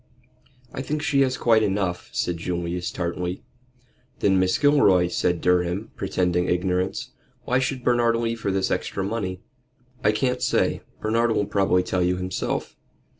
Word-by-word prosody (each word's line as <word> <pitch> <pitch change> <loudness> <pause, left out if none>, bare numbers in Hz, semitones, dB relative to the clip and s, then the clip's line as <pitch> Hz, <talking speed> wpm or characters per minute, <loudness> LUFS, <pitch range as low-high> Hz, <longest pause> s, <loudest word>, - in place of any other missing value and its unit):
"I - - -4
think 150 +2 -3
she 145 -3 +2
has 130 -1 +1
quite 115 -2 +4
enough," 95 -4 -1
said 90 -1 -1
Julius, 85 +1 -3
tartly. 90 0 -3 0.7
"Then 95 -2 +3
Mrs. 95 +7 +1
Gilroy," 105 -12 +5
said 90 -1 0
Durham, 90 +3 +1
pretending 90 0 0
ignorance. 90 +1 -1 0.3
"Why 125 +1 +1
should 130 -1 -2
Bernard 120 -1 +3
leave 115 0 -2
her - - -1
this 95 0 0
extra 95 - -2
money?" 95 -3 -3 0.6
"I 105 - +5
can't 125 +3 -1
say. - - +1 0.2
Bernard 115 +2 +2
will 105 - +1
probably 95 -3 +2
tell 90 0 -1
you 90 +1 +1
himself. 90 0 -3
95 Hz, 150 wpm, -24 LUFS, 90-115 Hz, 0.7 s, Gilroy